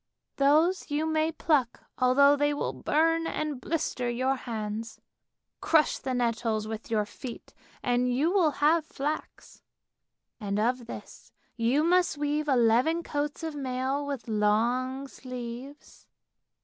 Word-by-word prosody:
Those 310 +7 +3
you 295 +2 0
may 315 0 +1
pluck 295 -6 0 0.2
although 280 +3 +5
they 290 0 +1
will - - -2
burn 330 +2 +1
and 300 -6 -3
blister 300 -6 -2
your 255 +3 0
hands. 225 -2 -5 0.6
Crush 315 -2 +3
the 260 -1 -3
nettles 230 -3 0
with 220 0 -6
your 215 -2 +1
feet 235 +3 -9 0.3
and 245 0 +1
you 285 +7 +2
will 365 -5 +4 0.2
have 320 +1 +4
flax, 300 0 -5 0.8
and 205 -2 -2
of 240 +2 0
this - - -10 0.2
you 245 +6 +2
must 350 -2 +3
weave 295 +1 -1
eleven 255 +6 +3
coats 290 +1 -3
of 320 -1 -3
mail 265 0 -2
with 280 -5 -5
long 240 +5 +1
sleeves. 255 +2 -9
270 Hz, 130 wpm, -28 LUFS, 240-305 Hz, 0.8 s, although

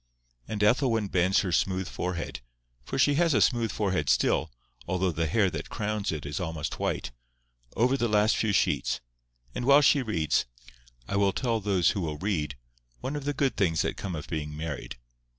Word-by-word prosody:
And 105 -1 -2
Ethelwyn 115 -2 +2
bends 95 +1 +3
her 95 - -2
smooth 95 +1 0
forehead—for - - -6
she 145 +2 +4
has 165 -5 +3
a - - +4
smooth 115 0 +2
forehead 95 -9 -1
still, 80 - +2 0.4
although 95 0 0
the 80 0 -1
hair 100 +3 +2
that - - -5
crowns 105 -2 -2
it 75 -3 -5
is 75 +3 -3
almost 80 -4 -4
white—over - - -3
the 120 - +1
last 105 0 +3
few 110 - +1
sheets; 100 - +1 0.5
and - - -4
while 140 +3 +6
she 145 -1 +5
reads, 95 - 0 0.6
I 100 - -1
will 100 -1 +3
tell 120 -3 0
those 95 -4 +2
who 100 - -3
will 75 -3 -3
read, 75 -7 -2 0.5
one 140 - -3
of 145 -1 -5
the 145 - 0
good 135 -1 +1
things 85 -6 +1
that - - -2
come 95 -4 -5
of 75 - -6
being 75 -2 -4
married. 80 -5 -5
95 Hz, 180 wpm, -28 LUFS, 75-110 Hz, 0.6 s, while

